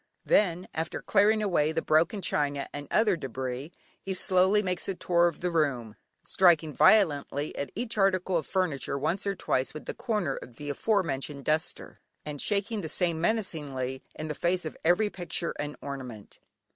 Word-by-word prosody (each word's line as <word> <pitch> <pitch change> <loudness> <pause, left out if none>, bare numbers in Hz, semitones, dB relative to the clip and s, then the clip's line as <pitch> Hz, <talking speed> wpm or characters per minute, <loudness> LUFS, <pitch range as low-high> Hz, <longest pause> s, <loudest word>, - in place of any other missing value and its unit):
Then, 180 -3 +2
after 160 +1 -3
clearing 215 +1 +3
away 160 -6 +2
the 165 0 -1
broken 165 +6 +2
china 145 -3 0
and 145 0 -6
other 215 -3 +3
debris, 130 0 -5 0.3
he 190 -1 -3
slowly 190 +3 +3
makes 180 0 -2
a 195 - -1
tour 175 -1 +3
of 170 - -4
the 180 0 0
room, 130 -9 0 0.3
striking 165 -4 +3
violently 150 -6 +3
at 140 -2 -4
each 225 0 -2
article 190 -1 +2
of 160 -4 0
furniture 160 -8 -1
once 170 +8 -1
or 200 - 0
twice 130 -4 -1
with 155 - -7
the - - -4
corner 210 - -1
of 120 - -10
the 145 +3 -5
afore 200 +7 +1
mentioned 140 -2 -4
duster, 155 +1 -2 0.3
and 150 -2 -3
shaking 205 +1 0
the 160 - -5
same 170 -2 0
menacingly 145 - -2
in 155 - -5
the 150 - -2
face 175 +3 0
of 155 - -5
every 190 +6 +3
picture 175 -1 -2
and 150 0 -3
ornament. 125 -7 -7
165 Hz, 175 wpm, -28 LUFS, 145-190 Hz, 0.3 s, clearing